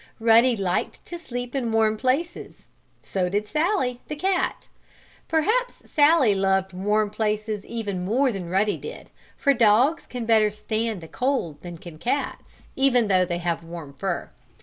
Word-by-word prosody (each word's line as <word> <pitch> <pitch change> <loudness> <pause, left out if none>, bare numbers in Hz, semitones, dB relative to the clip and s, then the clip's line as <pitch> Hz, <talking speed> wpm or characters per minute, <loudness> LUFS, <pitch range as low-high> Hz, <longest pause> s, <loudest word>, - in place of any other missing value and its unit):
Ruddy 230 +2 +5
liked 185 -2 -2
to 345 - -6
sleep 245 -6 -6
in 250 -4 -1
warm 220 -1 +3
places. 270 +9 -2 0.4
So 185 -2 -1
did 205 +3 -1
Sallie, 300 - 0
the 300 - -4
cat. 370 +4 -1 0.6
Perhaps 435 +11 0
Sallie 290 -7 +5
loved 190 -1 +1
warm 210 +3 0
places 215 -1 -2
even 205 -6 -3
more 250 +8 +2
than 185 -5 -5
Ruddy 200 +3 +1
did, 465 - -9 0.3
for 280 - +3
dogs 240 +6 +3
can 245 -2 -5
better 220 -2 +4
stand 215 -1 -3
the 165 - -9
cold 250 - -2
than 175 -1 -8
can 165 -2 -11
cats, 260 - -3
even 250 -5 +3
though 185 -1 +4
they 175 -1 -2
have 170 -1 -2
warm 165 -4 -9
fur. 185 +4 -3
220 Hz, 155 wpm, -24 LUFS, 190-260 Hz, 0.6 s, Ruddy